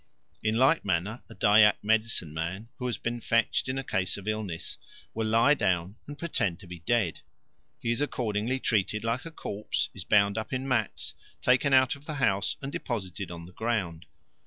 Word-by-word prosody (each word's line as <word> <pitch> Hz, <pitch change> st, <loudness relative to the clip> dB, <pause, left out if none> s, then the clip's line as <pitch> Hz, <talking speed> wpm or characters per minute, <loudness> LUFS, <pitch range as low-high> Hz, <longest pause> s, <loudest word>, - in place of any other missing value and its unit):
In 110 Hz, +1 st, +1 dB
like 135 Hz, +6 st, +4 dB
manner 100 Hz, +5 st, -1 dB
a 110 Hz, -, -11 dB
Dyak 105 Hz, 0 st, +5 dB
medicine 110 Hz, -7 st, +1 dB
man, 90 Hz, +8 st, -4 dB
who 125 Hz, -, -2 dB
has 120 Hz, -5 st, -1 dB
been 120 Hz, +3 st, -3 dB
fetched 115 Hz, +3 st, +1 dB
in 130 Hz, -, -1 dB
a 135 Hz, -, -2 dB
case 95 Hz, -6 st, -1 dB
of 100 Hz, 0 st, -9 dB
illness, 105 Hz, -6 st, -3 dB, 0.3 s
will 110 Hz, 0 st, -1 dB
lie 115 Hz, +6 st, +5 dB
down 90 Hz, -6 st, 0 dB
and 145 Hz, 0 st, -7 dB
pretend 100 Hz, -, -1 dB
to 100 Hz, -, -12 dB
be 90 Hz, -1 st, -8 dB
dead. 100 Hz, -1 st, 0 dB, 0.6 s
He 115 Hz, -, -1 dB
is 120 Hz, -, 0 dB
accordingly 120 Hz, -2 st, -1 dB
treated 105 Hz, -2 st, 0 dB
like 115 Hz, +5 st, -1 dB
a 165 Hz, -, -6 dB
corpse, 105 Hz, -8 st, -2 dB
is -, -, -6 dB
bound 100 Hz, +1 st, +3 dB
up 110 Hz, -, -6 dB
in 130 Hz, +1 st, -2 dB
mats, 80 Hz, -, 0 dB, 0.3 s
taken 130 Hz, +3 st, +3 dB
out 130 Hz, -1 st, +5 dB
of 140 Hz, +1 st, -17 dB
the 155 Hz, -, -3 dB
house, 100 Hz, -7 st, +1 dB
and 135 Hz, -, -4 dB
deposited 100 Hz, -8 st, -4 dB
on 85 Hz, -1 st, -7 dB
the 90 Hz, -, -14 dB
ground. 95 Hz, -7 st, -2 dB
110 Hz, 190 wpm, -28 LUFS, 95-125 Hz, 0.6 s, Dyak